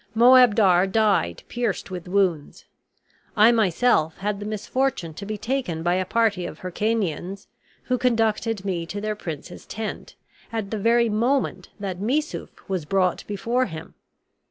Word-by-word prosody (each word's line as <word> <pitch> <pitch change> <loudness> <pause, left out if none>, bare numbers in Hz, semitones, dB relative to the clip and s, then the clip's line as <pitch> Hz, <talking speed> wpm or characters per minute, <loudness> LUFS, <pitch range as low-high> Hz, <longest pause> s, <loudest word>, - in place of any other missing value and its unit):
Moabdar 220 -6 +6
died 195 - +1
pierced 235 -5 -3
with 180 -1 -6
wounds. 180 -6 0 0.7
I 215 +3 +7
myself 200 -6 +2
had 200 0 -2
the 205 - -5
misfortune 215 -4 -2
to 200 +5 -8
be 215 0 -3
taken 215 -8 -2
by 175 +1 +2
a 185 +1 0
party 200 -4 +1
of 155 - -10
Hircanians, 195 -1 -2 0.4
who 250 -1 -1
conducted 225 -3 +1
me 175 -4 -2
to 205 - -5
their 215 +1 -2
prince's 160 -8 -8
tent, 220 -1 -6 0.4
at 220 -3 -3
the 220 - -2
very 235 +3 +3
moment 240 +6 0
that 190 -3 -4
Missouf 280 +10 -1 0.2
was 190 -4 -2
brought 185 +1 +1
before 235 +5 0
him. 160 -3 -9
205 Hz, 145 wpm, -24 LUFS, 185-230 Hz, 0.7 s, I